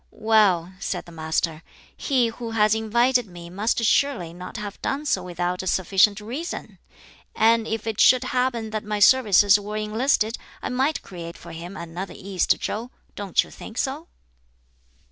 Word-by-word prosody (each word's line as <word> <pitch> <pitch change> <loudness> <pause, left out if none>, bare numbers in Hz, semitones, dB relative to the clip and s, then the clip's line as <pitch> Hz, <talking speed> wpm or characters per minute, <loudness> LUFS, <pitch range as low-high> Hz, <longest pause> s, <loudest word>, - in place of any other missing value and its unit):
"Well," 205 -6 +2
said 200 - -3
the 170 - -13
Master, 160 0 -2 0.3
"he 255 -5 +1
who 230 +1 -7
has 210 0 +4
invited 235 +2 +2
me 175 -2 -11
must 215 +5 0
surely 215 -12 +1
not 180 +5 -8
have 210 -2 -7
done 285 +2 -2
so 195 -10 +1
without 180 0 -3
a 190 - -6
sufficient 195 +3 +3
reason! 255 +11 -6 0.6
And 225 0 +3
if 225 -1 -3
it 220 -2 -3
should 255 0 +6
happen 250 -3 -1
that 215 -1 -3
my 210 0 -3
services 205 -2 +6
were 210 +1 -5
enlisted, 220 +1 0 0.2
I - - -2
might 265 +5 0
create 170 -2 -8
for - - -11
him 175 +4 -8
another 170 +3 -6
East 190 -2 0
Chow 230 +4 -4 0.2
don't 200 -3 +1
you - - -15
think 225 - -10
so?" 290 +5 -2
210 Hz, 165 wpm, -24 LUFS, 185-235 Hz, 0.6 s, should